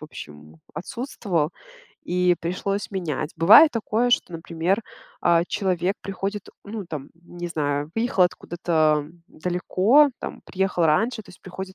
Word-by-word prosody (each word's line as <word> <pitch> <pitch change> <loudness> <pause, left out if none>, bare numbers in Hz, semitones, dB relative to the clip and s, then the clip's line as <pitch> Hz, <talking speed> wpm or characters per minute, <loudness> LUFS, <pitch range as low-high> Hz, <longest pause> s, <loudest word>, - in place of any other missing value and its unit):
в - - -8
общем, 75 - -11 0.2
отсутствовал, 185 - -2 0.6
и 180 0 +3
пришлось 190 +4 -3
менять. 170 -6 -3
Бывает 220 - +8
такое, 230 +1 0
что, 210 - +1
например, 170 +5 -1 0.4
э, 170 -1 +4
человек 185 -1 0
приходит, 195 +1 -4 0.2
ну, 205 -1 -6
там, 145 -4 -6
не 175 +1 -8
знаю, 145 -2 -2
выехал 225 -4 +2
откуда-то 160 -4 0 0.2
далеко, 185 - +3
там, - - -6
приехал 185 -2 0
раньше, 220 +9 +1
то - - -16
есть - - -18
приходит 190 +1 -8
180 Hz, 135 wpm, -24 LUFS, 165-200 Hz, 0.6 s, Бывает